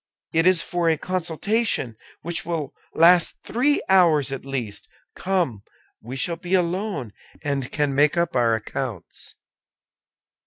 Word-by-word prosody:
It 165 +2 +3
is 185 -2 +5
for 175 -2 0
a 160 - +2
consultation, 185 - -1 0.3
which 170 +1 -2
will 160 -5 -4 0.2
last 170 +1 +5
three 280 +6 +1
hours 170 -8 +4
at 135 - -5
least. 120 -7 -5 0.3
Come! 175 - -1 0.4
We 120 +4 -8
shall 165 +6 0
be 180 +2 -1
alone, 180 - -2 0.3
and 140 -3 -2
can 145 -2 0
make 145 +4 +3
up 170 -4 0
our 115 -2 +3
accounts." 110 -3 -6
165 Hz, 130 wpm, -23 LUFS, 135-180 Hz, 0.4 s, is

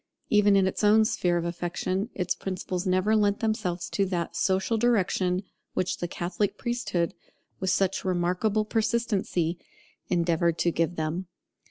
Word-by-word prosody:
Even 210 -1 +5
in 195 -1 +4
its 190 - -2
own 215 +1 +6
sphere 175 -4 +1
of 170 - -2
affection, 175 +4 -2
its 180 -2 0
principles 185 0 -4
never 185 +4 +2
lent 205 -1 +2
themselves 185 -6 -1
to 200 - +1
that 180 -3 -2
social 190 +4 +1
direction 195 -5 +1 0.3
which 185 - 0
the 175 - -2
Catholic 175 +4 -2
priesthood, 240 -8 -1 0.5
with 190 - -1
such 195 0 +1
remarkable 185 +4 +1
persistency, 210 -7 0 0.5
endeavoured 170 -1 +1
to 170 - +2
give 165 0 +1
to - - -13
them. 160 +4 -2
185 Hz, 150 wpm, -27 LUFS, 175-210 Hz, 0.5 s, own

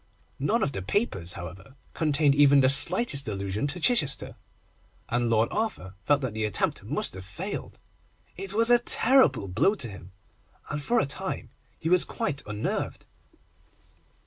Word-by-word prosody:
None 215 - +1
of 140 - 0
the 95 - -5
papers, 95 - -1
however, 95 +9 -10 0.2
contained 150 -2 +2
even 140 0 +5
the 130 - +4
slightest 140 - +3
allusion 100 +4 -3
to 165 +5 -4
Chichester, 160 - +1 0.7
and 120 0 0
Lord 115 0 +2
Arthur 210 - -3
felt 145 0 +3
that 130 -5 -3
the 110 0 -3
attempt 105 -2 -1
must - - -2
have 95 0 -8
failed. 95 0 -6 0.6
It 195 - -6
was 230 +3 +2
a 240 - +7
terrible 230 - +4
blow 145 - +2
to 130 - -3
him, 95 -3 -11 0.6
and 150 0 -3
for 235 +11 +1
a - - +1
time 190 +7 -4 0.3
he 160 - -5
was 180 +1 +6
quite 145 -1 -3
unnerved. 105 0 -4
140 Hz, 155 wpm, -26 LUFS, -, 0.7 s, a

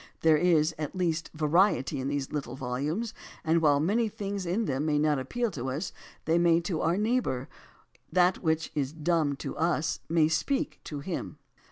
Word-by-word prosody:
There 160 -1 +5
is, 160 -1 +3
at 150 +4 -4
least, 165 -3 -1
variety 155 -2 +2
in 130 - -2
these 140 -1 -2
little 150 -2 -4
volumes, 145 - -2 0.3
and 165 +1 +2
while 145 -3 +4
many 215 +9 +1
things 200 -2 -4
in 205 +6 0
them 135 -2 -1
may 150 -1 +1
not 150 -1 +2
appeal 235 - -2
to 130 -4 -4
us, 150 +7 -3 0.3
they 165 +1 +3
may 170 -1 +4
to 170 -2 -2
our 170 +3 +2
neighbor. 210 - 0 0.6
That 180 +2 +3
which 160 -1 0
"is 140 -1 -1
dumb 160 -2 +1
to - - -6
us 165 -1 0
may 160 -2 +4
speak 270 - -1
to 145 -2 -5
him." 170 +3 -5
160 Hz, 180 wpm, -28 LUFS, 145-180 Hz, 0.6 s, There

